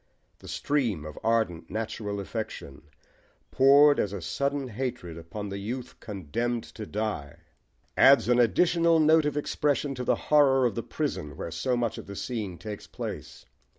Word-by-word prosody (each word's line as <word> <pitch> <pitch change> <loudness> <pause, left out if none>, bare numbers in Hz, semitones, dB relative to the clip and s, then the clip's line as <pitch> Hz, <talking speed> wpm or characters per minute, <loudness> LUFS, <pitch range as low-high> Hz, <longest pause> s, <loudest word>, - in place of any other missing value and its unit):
The - - -13
stream 120 - -1
of 75 -1 -8
ardent 110 -8 0
natural 105 -1 -4
affection, 95 - -6 0.6
poured 140 +2 +6
as 100 0 -1
sudden 140 +7 -2
hatred 120 -7 -4
upon 90 +5 -7
the 100 0 -5
youth 120 +5 -6
condemned 115 +4 -3
to 110 -2 -7
die, 90 -8 -4 0.6
adds 135 -1 +6
an 125 0 +4
additional 165 - +3
note 155 0 +5
of 150 0 -1
expression 145 -1 0
to 125 -1 -5
the - - +2
horror 135 -3 +4
of 120 - +1
the - - -3
prison 75 -2 -4
where 85 - -5
so 125 +10 -1
much 120 -2 -1
of - - -10
the 100 - -7
scene 105 -6 -4
takes 105 +1 -8
place. - - -7
115 Hz, 155 wpm, -27 LUFS, 100-135 Hz, 0.6 s, poured